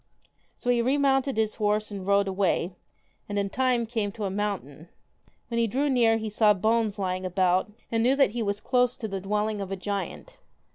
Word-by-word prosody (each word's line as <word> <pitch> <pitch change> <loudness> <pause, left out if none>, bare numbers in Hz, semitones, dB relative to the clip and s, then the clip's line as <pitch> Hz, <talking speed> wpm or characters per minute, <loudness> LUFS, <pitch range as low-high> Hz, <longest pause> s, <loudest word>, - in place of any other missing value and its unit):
So 245 - 0
he 240 -1 +2
remounted 270 0 +2
his 220 -1 +1
horse 210 +1 +1
and 195 -2 -6
rode 200 0 +3
away, 190 -2 0 0.6
and 205 - -2
in 200 -1 -1
time 250 -1 +1
came 220 -3 -2
to 220 -2 -6
a 195 - -1
mountain. 185 -6 -4 0.6
When 235 -1 -1
he 230 - +2
drew 275 +6 0
near 230 -3 +4
he 220 0 -4
saw 210 0 +4
bones 220 +1 +1
lying 185 -1 -2
about, 185 +1 +1 0.2
and 225 -1 +1
knew 255 +4 +3
that 275 -7 +3
he 235 +1 -3
was 205 -1 -1
close 250 0 +1
to 220 - -4
the 195 -2 -4
dwelling 210 +1 -1
of 195 -1 -5
a - - -1
giant. 205 - -5
210 Hz, 200 wpm, -27 LUFS, 195-235 Hz, 0.6 s, near